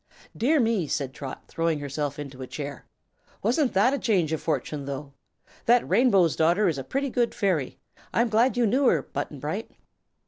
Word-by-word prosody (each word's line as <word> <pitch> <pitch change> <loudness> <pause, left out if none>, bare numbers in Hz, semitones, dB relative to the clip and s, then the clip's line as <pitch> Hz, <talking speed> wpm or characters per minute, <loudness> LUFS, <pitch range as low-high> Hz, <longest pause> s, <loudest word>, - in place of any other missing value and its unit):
"Dear 295 +6 +2
me," 225 - +1
said 135 -2 -2
Trot, 135 -1 -7
throwing 165 -1 0
herself 145 0 -3
into 140 -3 -8
a 130 - -5
chair, 140 -1 -7 0.6
"wasn't 250 +5 +2
that 200 +6 +4
a - - +1
sudden - - -9
change 180 -8 +1
of 160 - -2
fortune, 145 -1 -2
though? 140 0 -6 0.5
That 240 +1 +4
Rainbow's 195 - +4
Daughter 175 +6 +3
is 155 -5 0
a - - -4
pretty 275 - -2
good 240 -1 0
fairy. 180 - 0 0.3
I'm 235 +1 +2
glad 235 +4 +3
you 245 - +3
knew 255 +5 +3
her, - - +3
Button - - -5
Bright." - - -4
175 Hz, 185 wpm, -26 LUFS, 145-235 Hz, 0.6 s, that